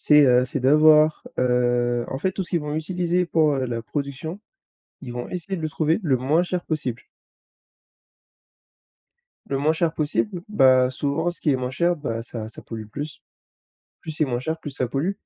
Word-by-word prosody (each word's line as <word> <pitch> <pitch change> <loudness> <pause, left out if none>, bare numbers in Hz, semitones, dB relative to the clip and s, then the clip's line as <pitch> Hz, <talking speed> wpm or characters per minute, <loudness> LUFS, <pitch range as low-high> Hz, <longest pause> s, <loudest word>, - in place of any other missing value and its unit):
c'est 150 0 +6
heu, 125 0 +5
c'est 130 +2 -3
d'avoir, 155 +3 +5 0.2
heu 120 -1 +1
en 135 - -4
fait 185 +6 0
tout 190 0 -4
ce - - -9
qu'ils 170 - +1
vont 150 0 -4
utiliser 175 +2 0
pour, 155 -3 +3
heu, 130 -1 -1
la 115 -1 -3
production, 140 - -4 0.6
ils 125 -3 -7
vont 120 0 -5
essayer 185 +2 -4
de 170 - -6
le 155 - -2
trouver 160 +2 +1
le 135 -5 +2
moins 150 +7 +2
cher 180 0 -3
possible. 130 -7 -3 2.4
Le 135 - -1
moins 150 +3 +2
cher 160 0 0
possible. 170 +5 -1
Bah, 130 -8 +5
souvent 145 +6 -1
ce - - -7
qui 150 - +2
est - - +3
moins 125 -1 -3
cher, 175 +6 +1
bah, 115 -7 -4
ça 110 -2 -6
ça - - -10
pollue 110 -2 -7
plus. 140 +5 -7 0.8
Plus 160 - -7
c'est 155 0 +1
moins 125 -4 -2
cher, 160 +6 -3
plus 150 - -7
ça 130 -2 -2
pollue. 140 +10 -1
145 Hz, 195 wpm, -23 LUFS, 125-160 Hz, 2.4 s, c'est